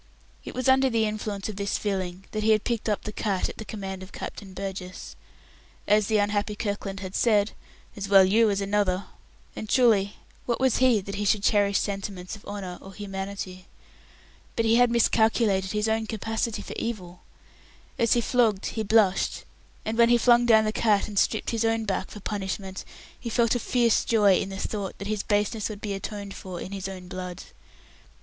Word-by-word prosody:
It - - -8
was 255 0 -1
under 265 0 +5
the 225 -2 +2
influence 210 -2 -3
of 215 -3 -6
this 200 -1 -1
feeling 190 -2 -3
that 215 - -2
he 220 +1 +4
had 215 - +1
picked 230 -2 -1
up 210 - -1
the 215 - -5
cat 200 -3 -1
at - - -9
the - - -4
command 195 -3 -6
of 190 - -10
Captain 195 -2 -7
Burgess. 185 -1 -6 0.7
As 210 0 +4
the 220 - +2
unhappy 205 0 0
Kirkland 200 -2 -4
had 190 -1 -6
said, 210 -2 +3 0.4
"As 195 -1 -5
well 195 -1 +8
you 220 +4 +4
as 200 0 0
another"; 200 -1 +1 0.5
and 215 - -6
truly, 210 -6 +3 0.3
what 235 - 0
was 260 -2 +3
he 250 -5 +4
that 200 +1 -7
he 205 - -1
should 205 0 +2
cherish 200 -2 +3
sentiments 195 -2 -4
of 205 - -15
honour 195 -3 -6
or 195 -1 -12
humanity? 195 -2 -6 0.9
But 230 - +1
he 225 +1 +4
had 245 0 +5
miscalculated 220 -4 +2
his 210 +1 0
own 220 0 0
capacity 225 +1 -2
for - - -7
evil. 185 -6 -5 0.8
As 230 -1 +4
he 240 - +2
flogged, 225 -5 +2
he 220 - -2
blushed; 215 -3 +2 0.4
and 225 +2 -2
when 235 0 +6
he 240 - +6
flung 240 0 +4
down 220 -2 +6
the 215 - +1
cat 215 -2 +2
and 205 -2 0
stripped 220 - +1
his 230 -1 0
own 225 0 +1
back 190 -2 -2
for 210 - -10
punishment, 190 -1 -4 0.4
he 235 - -5
felt 230 0 +2
a 245 - 0
fierce 235 -1 +2
joy 205 -5 +4
in 195 - -3
the 195 - -6
thought 200 -1 -4
that 200 - -6
his 210 -1 -1
baseness 210 +1 0
would 210 -2 -7
be 205 -1 -3
atoned 200 0 -5
for 185 -2 -7
in 190 - -7
his 195 -1 -4
own 185 -2 -8
blood. 180 -1 -6
205 Hz, 200 wpm, -26 LUFS, 195-225 Hz, 0.9 s, well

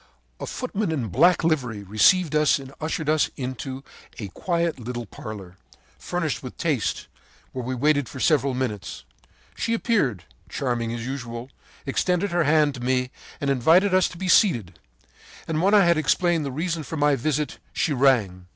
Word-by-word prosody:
“A - - -5
footman 215 -7 -3
in 130 -9 -2
black 170 - +4
livery 125 -10 0
received 140 - +3
us 150 -1 +4
and 135 -1 -10
ushered 155 0 -3
us 155 0 +2
into 130 +1 -5 0.3
a 105 -4 -6
quiet 170 - -1
little 120 0 -5
parlor, 95 -3 -9 0.4
furnished - - -2
with - - -9
taste, - - -1 0.5
where 130 - -4
we 130 +2 -3
waited 145 +1 +1
for 130 - -8
several 140 -3 +2
minutes. 110 - -4 0.5
She 230 - -1
appeared, 145 - 0 0.3
charming 120 -3 -2
as 115 0 -5
usual, 125 -1 -6 0.3
extended 180 +7 0
her 175 -2 +1
hand 150 -1 +3
to 130 - -8
me 125 +1 0 0.3
and 140 -1 0
invited 165 +10 +4
us 185 -1 +4
to 180 - -10
be 190 - -4
seated; 120 - +3 0.7
and 160 -1 -1
when 200 +3 +4
I 200 -3 +6
had 170 -2 +3
explained 165 +1 +1
the - - -4
reason 165 +4 -2
of 160 +2 -6
my 145 -1 +3
visit, 150 +3 -2
she 155 - 0
rang. 110 -10 +2
140 Hz, 170 wpm, -24 LUFS, 120-165 Hz, 0.7 s, I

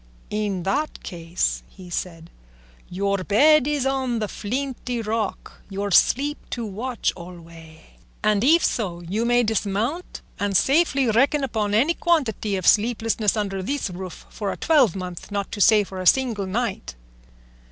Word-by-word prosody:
"In 205 -4 -2
that 290 - -2
case," 170 0 -2 0.3
said 165 -2 -5 0.6
he, - - -11
"'Your 200 +1 0
bed 285 +8 +5
is 295 -3 0
on 265 -3 0
the 215 -1 -2
flinty 250 +3 -4
rock, 220 -1 -4
Your 200 +1 -3
sleep 285 - +3
to 235 -2 -4
watch 230 +4 -2
alway;' 165 -2 -12 0.4
and 210 -1 +2
if 325 +6 +5
so, 180 -7 -2
you 200 +7 -2
may 240 0 +3
dismount 220 - -2 0.2
and 200 -2 +2
safely 280 - +3
reckon 275 +6 +2
upon 215 -5 -1
any 280 +10 +3
quantity 255 - 0
of 185 -2 -3
sleeplessness 225 -1 +2
under 195 -2 -2
this 255 0 -2
roof 180 -1 -8
for 205 -2 -3
a - - -6
twelvemonth, 190 - +1
not 200 -1 -3
to 205 - -4
say 210 0 +6
for 190 -1 -7
a 185 - -1
single 230 -6 +2
night." 205 - -3
215 Hz, 150 wpm, -23 LUFS, 190-260 Hz, 0.6 s, say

